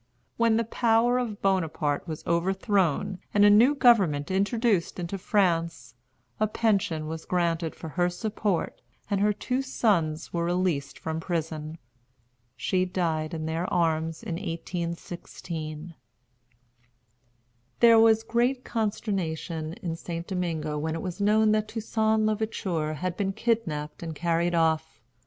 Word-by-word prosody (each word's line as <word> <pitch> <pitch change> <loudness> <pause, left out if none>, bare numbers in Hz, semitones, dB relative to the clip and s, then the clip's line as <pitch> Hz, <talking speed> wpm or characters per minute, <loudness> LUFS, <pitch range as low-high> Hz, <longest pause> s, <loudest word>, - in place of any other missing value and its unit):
When 230 -1 +3
the 230 - +2
power 235 +2 +2
of 225 -5 -4
Bonaparte 160 -6 0
was 155 -2 -6
overthrown, 190 0 +1 0.2
and 205 0 +6
a 205 - +7
new 240 +8 +6
government 195 - +4
introduced 200 -1 +1
into 180 +2 -4
France, 170 - 0 0.5
a 215 - +3
pension 200 -8 0
was 160 0 -5
granted 170 -2 -1
for 160 - -8
her 175 +3 +1
support, 205 0 -2 0.3
and 200 -1 +1
her 210 +1 +4
two 250 +5 -2
sons 170 -12 0
were 170 -1 0
released 175 -5 -1
from 160 0 -4
prison. 160 -2 -3 0.8
She 185 -1 +1
died 165 -3 -1
in 155 -1 -4
their 165 +3 -2
arms 165 0 0
in 175 -7 -3
1816. 170 -2 -5 1.9
There 230 -1 +7
was 225 0 +5
great 245 +3 +1
consternation 180 -8 -2
in 165 -2 -2
St. 170 0 -6
Domingo 160 -5 -2
when 160 +1 -2
it 165 - -5
was 185 +2 -5
known 215 +1 +4
that 215 0 +1
Toussaint 220 0 0
l'Ouverture 195 -8 -1
had 180 +3 -3
been 195 -1 -1
kidnapped 165 -11 -2
and 165 -2 -5
carried 170 +1 0
off. 160 -1 +1
180 Hz, 135 wpm, -27 LUFS, 160-215 Hz, 1.9 s, a